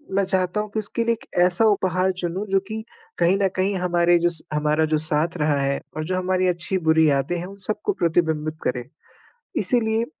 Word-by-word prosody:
मैं 200 - +3
चाहता 185 +1 0
हूँ 215 - -6
कि 220 - 0
उसके 215 +2 -2
लिए 235 - +3
एक 230 - -10 0.2
ऐसा 180 +5 +3
उपहार 185 -2 +1
चुनूँ, 180 +4 -2
जो 195 0 +2
कि 220 0 -5 0.3
कहीं 175 +3 +3
न 195 - +4
कहीं 190 +2 0
हमारे 175 -1 +3
जो 175 +1 +2
स 165 -2 -2
हमारा 150 +1 +2
जो - - +4
साथ 155 +2 0
रहा 150 -2 +1
है 140 0 0 0.2
और 155 - -2
जो 185 +1 -1
हमारी 185 0 +1
अच्छी-बुरी 160 -3 +2
यादें 140 +5 0
हैं, 175 - -4
उन 195 +1 -10
सबको 320 - -1
प्रतिबिंबित 160 - 0
करे। 125 -1 -1 0.8
इसीलिए 225 -2 +1
180 Hz, 200 wpm, -23 LUFS, 160-195 Hz, 0.8 s, न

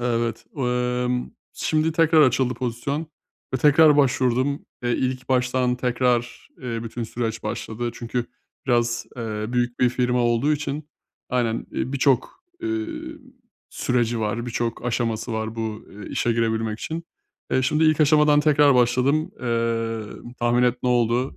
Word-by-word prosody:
Evet. 120 -1 -1
Emm, 125 -1 -1 0.2
şimdi 155 +1 0
tekrar 160 -1 +5
açıldı 130 -1 +2
pozisyon 130 +6 -3 0.5
ve - - +3
tekrar 150 +2 +6
başvurdum. 130 0 +1 0.2
Eee, 120 - 0
ilk 130 0 -2
baştan 125 -1 +1
tekrar, 125 -1 0
eee, 115 -2 -3
bütün 115 +1 -5
süreç 115 0 -3
başladı. 120 +2 -3
Çünkü 120 0 -3 0.4
biraz, 120 -1 +1
eee, 110 -3 -3
büyük 120 0 -1
bir 125 - +5
firma 125 0 0
olduğu 120 +5 +2
için, 145 0 -3 0.4
aynen, 120 -3 0
iii, 130 - -2
birçok, 140 - +1 0.2
eee, 335 -1 -1 0.8
süreci 120 -2 0
var, 110 +2 -2
birçok 120 -1 -3
aşaması 115 -1 -1
var 110 0 -3
bu, 110 -1 -4
eee, 105 +1 -10
işe 120 - 0
girebilmek 110 -1 0
için. 165 +1 -4 0.5
Eee, 130 - +2
şimdi 150 +5 +2
ilk 155 -1 +3
aşamadan 150 0 +5
tekrar 145 -2 +5
başladım. 125 +5 +2
Eee, 115 -2 -1 0.4
tahmin 120 +1 +2
et 125 0 +2
ne 125 - +1
oldu? 120 +1 +1
125 Hz, 140 wpm, -23 LUFS, 115-135 Hz, 0.8 s, tekrar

